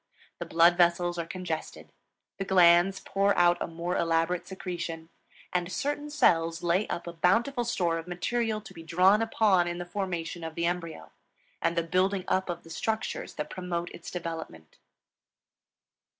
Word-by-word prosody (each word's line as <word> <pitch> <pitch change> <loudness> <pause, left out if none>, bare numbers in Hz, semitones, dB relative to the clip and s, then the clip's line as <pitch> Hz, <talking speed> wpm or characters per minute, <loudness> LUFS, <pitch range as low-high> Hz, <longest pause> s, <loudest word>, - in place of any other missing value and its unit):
The - - -5
blood 170 +1 +5
vessels 175 0 +2
are 165 - -3
congested; 175 -4 -5 0.5
the - - 0
glands 180 0 +5
pour 200 +1 +1
out 175 0 +4
a - - -1
more 170 +2 -3
elaborate 165 +1 0
secretion; 170 -3 -5 0.4
and 180 0 -1
certain 290 +8 -2
cells 165 - +2
lay 175 +4 +2
up 170 - -4
a 170 - -6
bountiful 230 +10 +2
store 175 -8 0
of 165 - -9
material 215 +5 -1
to - - -12
be 165 - -10
drawn 185 +6 +4
upon 210 -5 +3
in 175 0 -3
the 175 - -5
formation 175 -3 -4
of 160 -1 -6
the 170 - -1
embryo 170 - -4 0.5
and 170 +1 0
the 170 - +2
building 185 +3 +1
up 190 0 0
of 175 -1 -4
the 165 - -13
structures 220 +5 -3
that 150 0 -5
promote 175 -2 -4
its 170 - -9
development. 160 - -7
175 Hz, 165 wpm, -28 LUFS, 170-190 Hz, 0.5 s, blood